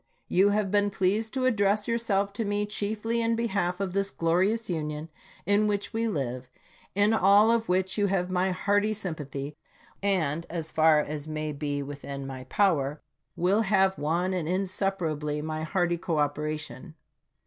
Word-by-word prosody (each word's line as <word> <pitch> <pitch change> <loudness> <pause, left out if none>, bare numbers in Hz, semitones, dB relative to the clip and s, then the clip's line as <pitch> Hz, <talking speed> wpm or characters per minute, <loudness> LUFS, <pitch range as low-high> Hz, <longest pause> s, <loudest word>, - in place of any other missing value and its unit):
You 195 +3 +4
have 205 -2 0
been 205 0 +3
pleased 200 +3 0
to 260 -1 +1
address 210 -3 +2
yourself 205 -4 0
to 225 - -2
me 205 0 0
chiefly 215 +3 -1
in 230 0 +1
behalf 195 -6 -1
of 195 -2 -2
this 195 0 0
glorious 190 +8 +1
Union 155 -2 -3 0.4
in 205 +3 +3
which 205 -1 -2
we 230 +1 0
live, 130 - -3 0.5
in 205 +2 +4
all 205 +1 +5
of 230 -3 0
which 185 +3 +1
you 205 - +3
have 185 -2 0
my 185 +1 +1
hearty 205 +3 +1
sym 195 -5 -4
pathy, 140 -1 -6 0.4
and, 170 -5 0
as 165 -2 -4
far 155 -1 +5
as 150 0 -5
may 155 0 -3
be 145 -1 -2
within 140 -1 -7
my 130 -1 -7
power, 150 -3 +1 0.4
will 190 +5 +2
have, 190 -2 +3
one 170 +5 0
and 170 -4 -2
inseparably, 180 -5 -1
my 155 +1 -3
hearty 175 +1 0
cooperation. 150 0 -2
185 Hz, 160 wpm, -27 LUFS, 155-205 Hz, 0.5 s, all